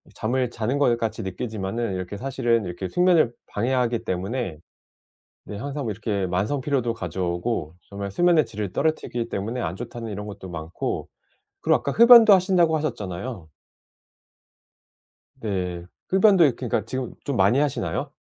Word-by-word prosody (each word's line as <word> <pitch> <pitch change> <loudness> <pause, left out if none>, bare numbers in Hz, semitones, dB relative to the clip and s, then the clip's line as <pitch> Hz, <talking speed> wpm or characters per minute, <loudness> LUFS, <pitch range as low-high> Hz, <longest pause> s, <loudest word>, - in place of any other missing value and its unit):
잠을 125 +3 0
자는 120 +4 -2
것 120 -5 +3
같이 115 -1 -2
느끼지만은 105 +2 -3
이렇게 95 +2 -5
사실은 120 -3 0
이렇게 90 +1 -5
숙면을 175 -9 +3
방해하기 120 +1 0
때문에 95 -1 -3 0.9
네 105 - -7
항상 140 +3 -4
이렇게 105 -2 -2
만성피로도 120 +6 -1
가져오고 90 -2 -3
정말 100 0 -5
수면의 170 - +3
질을 105 -3 -5
떨어뜨리기 120 -7 -1
때문에 110 +5 -3
안 85 -5 -3
좋다는 115 0 -7
이런 105 +1 -5
것도 100 -2 -8
많고 80 0 -4 0.5
그리고 - - +3
아까 - - -3
흡연도 235 -2 +9
하신다고 180 -3 +3
하셨잖아요. 105 - -4 1.9
네. 90 -5 -3 0.2
흡연도 190 -2 +5
이 140 - +4
그러니까 115 -4 -2
지금 130 +2 -4
좀 140 - -2
많이 100 +6 +4
하시나요? 145 -1 -1
115 Hz, 350 characters per minute, -24 LUFS, 95-135 Hz, 1.9 s, 흡연도